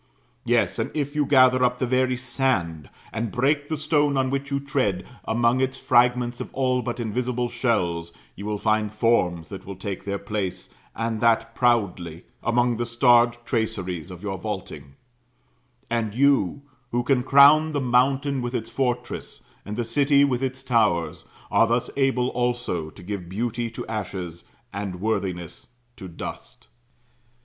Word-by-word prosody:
Yes: - - +1
and - - -1
if 145 -1 -2
you 150 -2 +1
gather 130 -2 +5
up 125 0 +2
the 130 - 0
very 130 0 +1
sand, 120 - -1 0.2
and 115 -1 -2
break 145 +3 +1
the 155 - -1
stone 145 -1 +1
on 130 -1 +1
which 140 0 -2
you 140 -1 0
tread, 130 - -1 0.2
among 120 +3 +2
its 130 0 -1
fragments 120 0 +2
of - - -7
all 130 -1 +1
but 120 0 -4
invisible 120 +2 -1
shells 90 -9 -1 0.2
you 100 +2 -7
will 105 -1 -1
find 110 0 +1
forms 90 -8 +1
that 95 -1 -8
will 100 0 -7
take 95 0 -5
their 100 0 -2
place, 100 -2 -4 0.3
and 115 -1 -2
that 115 0 +2
proudly, 95 -9 0 0.2
among 120 0 +1
the 120 - -1
starred 120 0 +4
traceries 95 -8 -2
of 90 +1 -10
your 95 -3 -3
vaulting; 85 -9 -6 0.9
and 115 -3 -2
you, 140 -2 +2 0.3
who 120 0 0
can 130 0 +2
crown 145 +4 +6
the 145 - -1
mountain 135 +2 +2
with 120 +1 -3
its 110 - -4
fortress, 125 -2 -3 0.2
and 105 +1 -6
the 120 - -1
city 140 +4 +4
with 125 -3 -1
its 130 0 -3
towers, 110 -10 +1 0.3
are 115 - +4
thus 120 +2 0
able 135 -2 +1
also 120 -11 -2
to 90 - -14
give 95 -2 -5
beauty 115 +4 -2
to 115 - -7
ashes, 95 -6 -5 0.3
and 100 -3 -4
worthiness 95 +2 -3 0.3
to 95 -4 -9
dust. 85 - -9
120 Hz, 160 wpm, -24 LUFS, 100-130 Hz, 0.9 s, crown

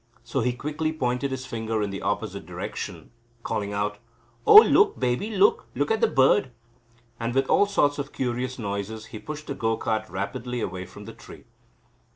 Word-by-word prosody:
So - - -2
he 125 +2 +1
quickly 150 +5 -2
pointed 130 -3 -1
his 130 0 -5
finger 110 -3 -2
in 100 - -3
the 100 - -5
opposite - - -3
direction, - - -6 0.3
calling 105 -2 -2
out: 105 +1 -2 0.5
"Oh, 435 - +8
look, 420 -1 +8
baby, 125 - 0
look! 420 - +3
Look - - 0
at 445 - +1
the 460 - +5
bird." 205 - +3 0.7
And 115 +1 -2
with 135 0 +3
all 205 - +4
sorts 145 -8 +2
of 140 +1 -4
curious 125 0 -2
noises 105 0 -4
he 110 - -5
pushed 150 +3 -7
the - - -4
go 115 -3 -1
cart 110 -1 -2
rapidly 120 +5 -4
away 95 -4 -4
from - - -12
the - - -9
tree. - - -13
125 Hz, 185 wpm, -25 LUFS, 110-150 Hz, 0.7 s, Oh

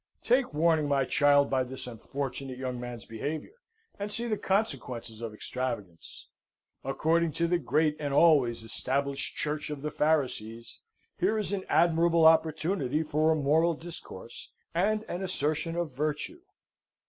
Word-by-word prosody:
Take 250 +2 +2
warning, 155 0 +2
my 140 -2 +2
child, 145 +1 +4
by 130 -1 +2
this 130 +1 -7
unfortunate 130 +2 -5
young 130 -1 -4
man's 120 -3 -7
behaviour, 145 - -5 0.5
and 205 +1 -3
see 235 +2 -3
the 225 -2 0
consequences 130 - -2
of 115 -2 -4
extravagance. 105 -6 -6 0.6
According 160 +4 +1
to 170 +3 +1
the 175 0 +2
great 150 +1 +1
and 145 -2 -2
always 140 -7 +4
Established 135 +4 -2
Church 150 0 -2
of 150 -2 -6
the 150 - -2
Pharisees, 120 -7 -1 0.4
here 205 +5 +2
is 205 -2 -2
an 190 -2 -2
admirable 165 0 +4
opportunity 160 -2 +3
for 155 +1 +1
a - - +3
moral 160 +3 +3
discourse, 150 - -9 0.2
and 210 +5 +1
an 175 -3 -5
assertion 165 -2 -1
of 170 -3 -2
virtue. 150 - -3
150 Hz, 145 wpm, -29 LUFS, 130-170 Hz, 0.6 s, child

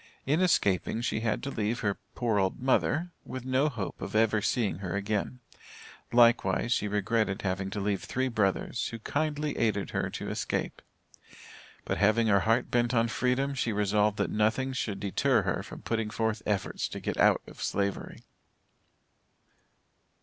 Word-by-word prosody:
In 150 +6 +2
escaping, 110 - +2
she 120 - -1
had 110 -1 -1
to 140 - -3
leave 110 +1 -1
her 100 -2 -1 0.2
"poor 115 -5 +1
old 95 -1 0
mother" 150 +6 +1
with 130 -1 -7
no 130 +3 +2
hope 110 -8 -5
of - - -5
ever 110 -1 +3
seeing 105 -5 0
her 95 -2 -4
again; 105 +5 -2 0.7
likewise 120 -2 +4
she 105 - 0
regretted 105 +1 0
having 95 0 -1
to 105 +1 -4
leave 100 -1 -1
three 130 +1 -1
brothers, 110 0 0
who 115 - -6
kindly 150 +5 -2
aided 110 -3 0
her - - -1
to - - -5
escape. - - -3 1.0
But - - -2
having 110 +3 +4
her 100 -3 +4
heart 115 +6 +1
bent 120 0 +2
on 115 0 +3
freedom, 130 +4 0
she 120 -3 -1
resolved 105 0 +1
that - - 0
nothing 110 +5 +1
should 105 -6 -3
deter 100 -1 +2
her - - -1
from - - -10
putting 115 -2 -1
forth 110 0 -1
efforts 100 -2 -1
to - - -6
get - - -3
out - - +4
of - - -12
Slavery. 100 0 -2
110 Hz, 165 wpm, -29 LUFS, 100-125 Hz, 1.0 s, likewise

